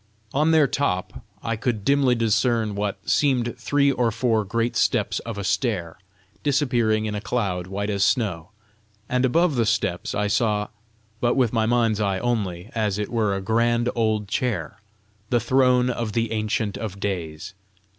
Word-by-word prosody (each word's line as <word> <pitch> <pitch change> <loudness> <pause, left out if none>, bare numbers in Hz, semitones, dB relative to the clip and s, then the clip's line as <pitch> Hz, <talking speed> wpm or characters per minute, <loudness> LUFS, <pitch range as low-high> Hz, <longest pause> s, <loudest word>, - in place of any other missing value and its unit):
On 150 +3 +2
their 160 -2 +5
top 125 -9 -2 0.2
I 115 0 -1
could 115 -3 -2
dimly 140 -3 +3
discern 115 -1 +1
what 100 0 -4
seemed 125 -5 +2
three 140 +4 +2
or 125 -3 +1
four 115 -1 +1
great 115 +4 -1
steps - - +1
of 115 -2 -7
a 100 - -3
stair, 95 -7 -1 0.4
disappearing 120 -7 +1
in 105 - -2
a 105 - -3
cloud 95 -7 -2
white 100 +2 -3
as 100 -1 +1
snow; 100 - 0 0.6
and 125 +1 +1
above 165 +5 +2
the 115 -2 +2
steps 110 -5 -1
I 105 - 0
saw, 105 0 +1 0.5
but 120 +1 +1
with 125 -4 +2
my 110 -1 +2
mind's 115 -3 +2
eye 100 -2 +1
only, 100 -4 -2
as 105 -3 0
it 105 -1 -3
were 110 -4 0
a 95 - -3
grand 115 +3 +1
old 110 -3 0
chair, 100 -5 -2 0.5
the 120 - +3
throne 125 +1 +3
of 115 -3 -3
the 115 0 0
Ancient 110 -1 -1
of 100 -3 -5
Days. 85 -4 -4
110 Hz, 165 wpm, -23 LUFS, 100-120 Hz, 0.6 s, their